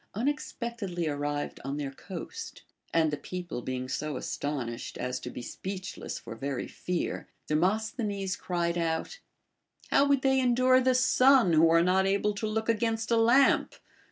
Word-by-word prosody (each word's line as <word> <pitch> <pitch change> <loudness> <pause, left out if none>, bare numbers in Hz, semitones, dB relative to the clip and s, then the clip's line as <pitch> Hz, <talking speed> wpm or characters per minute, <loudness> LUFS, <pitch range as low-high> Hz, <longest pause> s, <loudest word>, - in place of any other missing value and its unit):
unexpectedly 230 - -2
arrived 145 0 -2
on 140 +1 -3
their 140 -2 -3
coast; 135 - -8 0.3
and 160 -2 +3
the 150 - -2
people 175 -8 -6
being 130 0 -4
so 150 +3 -3
astonished 125 -5 -4
as 125 0 -3
to - - -6
be 125 - -7
speechless 185 +6 -6
for - - -8
very 135 +2 -3
fear, 180 -1 -3 0.2
Demos 190 +8 +1
thenes 200 -6 -2
cried 170 -1 -1
out: 165 - -2 0.7
How 280 - +5
would 280 -2 +2
they 265 0 +4
endure 255 +1 +4
the 255 0 +3
sun, 255 -5 +5
who 160 +1 +6
are 165 0 +5
not 190 +2 +3
able 200 +2 +1
to 205 +2 -3
look 220 +1 -2
against 225 0 0
a - - +5
lamp 240 +4 +4
185 Hz, 155 wpm, -29 LUFS, 150-235 Hz, 0.7 s, who